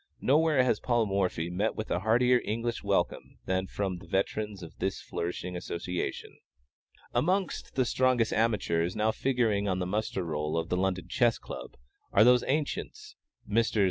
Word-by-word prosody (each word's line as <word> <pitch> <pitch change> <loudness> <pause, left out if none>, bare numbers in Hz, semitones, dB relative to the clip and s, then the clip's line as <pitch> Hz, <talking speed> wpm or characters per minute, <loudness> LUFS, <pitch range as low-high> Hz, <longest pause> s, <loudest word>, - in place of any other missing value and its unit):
Nowhere 150 -1 +4
has 120 -4 +1
Paul 120 -2 +1
Morphy 95 -4 -1
met 100 +5 0
with 110 - -5
a - - +1
heartier 120 +5 +3
English 115 +2 -2
welcome - - -1
than 95 0 0
from 95 -3 -3
the 85 - -14
veterans 100 +1 -2
of 80 - -10
this - - -1
flourishing 90 +1 -4
association. 90 0 -4 0.7
Amongst 185 +2 0
the 130 - +2
strongest 125 -2 +2
amateurs 95 -6 +1
now 110 +1 +2
figuring 115 -6 +1
on 95 -2 0
the 90 - -1
muster 95 0 -2
roll 75 0 -2
of 80 0 -2
the - - +1
London 95 -1 -1
Chess 120 -2 +2
Club - - -9 0.3
are 100 - +6
those 125 +1 +6
"ancients," 425 - -2 0.3
Messrs. 110 +1 +1
105 Hz, 160 wpm, -29 LUFS, 90-125 Hz, 0.7 s, are